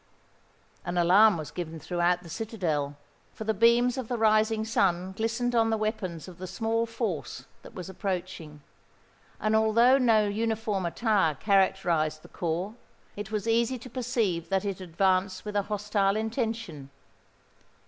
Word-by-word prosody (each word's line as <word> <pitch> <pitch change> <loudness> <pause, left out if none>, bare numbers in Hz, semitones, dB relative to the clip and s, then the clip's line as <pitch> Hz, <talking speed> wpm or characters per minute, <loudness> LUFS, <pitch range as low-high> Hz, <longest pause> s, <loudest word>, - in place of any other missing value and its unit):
An 175 0 -3
alarm 190 +4 +6
was 155 -2 -6
given 165 -2 -6
throughout 175 +1 0
the - - -12
citadel; 165 -7 -2 0.4
for - - -6
the 220 0 0
beams 235 +4 +3
of 250 - -5
the 245 - -2
rising 220 0 +2
sun 190 -4 +1
glistened 230 +4 -1
on 225 -1 +3
the 220 - +1
weapons 200 -7 -3
of 180 -2 -12
the 185 - -6
small 225 +4 -1
force 170 - -4 0.2
that - - -14
was 180 -3 -6
approaching; 180 -6 -5 0.8
and 215 0 +1
although 230 +4 +5
no 225 -4 +4
uniform 215 -3 -1
attire 195 -5 +1
characterised 170 -5 +1
the - - -14
corps, 175 +5 -3 0.4
it 205 0 -6
was 215 0 -2
easy 235 +3 +2
to 245 +1 -12
perceive 230 -9 -1
that 195 +1 0
it 195 -2 -3
advanced 185 +2 0
with 210 0 -5
a 205 - +3
hostile 205 -1 +1
intention. 220 - -3
205 Hz, 150 wpm, -28 LUFS, 175-225 Hz, 0.8 s, alarm